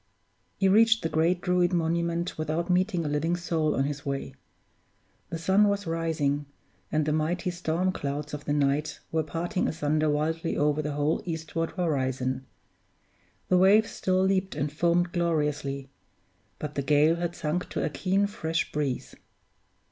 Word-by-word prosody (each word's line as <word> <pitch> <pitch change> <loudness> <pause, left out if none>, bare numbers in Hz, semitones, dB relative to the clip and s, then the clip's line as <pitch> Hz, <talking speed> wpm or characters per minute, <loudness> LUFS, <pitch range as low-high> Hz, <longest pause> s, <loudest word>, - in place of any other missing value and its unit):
He 195 - +3
reached 220 +3 +5
the 165 - 0
great 170 +3 +2
Druid 180 -1 +2
monument 170 +1 0
without 155 +3 -1
meeting 180 -2 +1
a - - 0
living 150 +4 0
soul 165 -3 0
on 135 - +2
his 145 0 -3
way. 135 - -3 1.0
The 165 - -3
sun 190 +5 +4
was 200 0 0
rising, 155 -4 -1 0.4
and 155 -1 +1
the 150 - +1
mighty 170 +4 0
storm 175 +1 0
clouds 145 -2 -4
of 150 0 -6
the - - -1
night 145 +1 0
were 160 - +1
parting 165 +5 -2
asunder 155 0 0
wildly 160 +3 -1
over 150 +1 +2
the 150 -1 -3
whole 145 +2 0
eastward 165 -1 -3
horizon. 130 -6 -1 1.0
The 180 - +5
waves 205 +4 +5
still 185 0 +1
leaped 190 -2 +1
and 145 0 -1
foamed 170 +2 +2
gloriously: 150 -5 -1 0.7
but 150 -1 -5
the 140 - -1
gale 150 +4 +4
had 175 0 -3
sunk 160 +4 -2
to - - -2
a - - 0
keen, 190 +7 +1
fresh 165 -5 -2
breeze. 145 -4 -2
160 Hz, 155 wpm, -27 LUFS, 150-175 Hz, 1.0 s, reached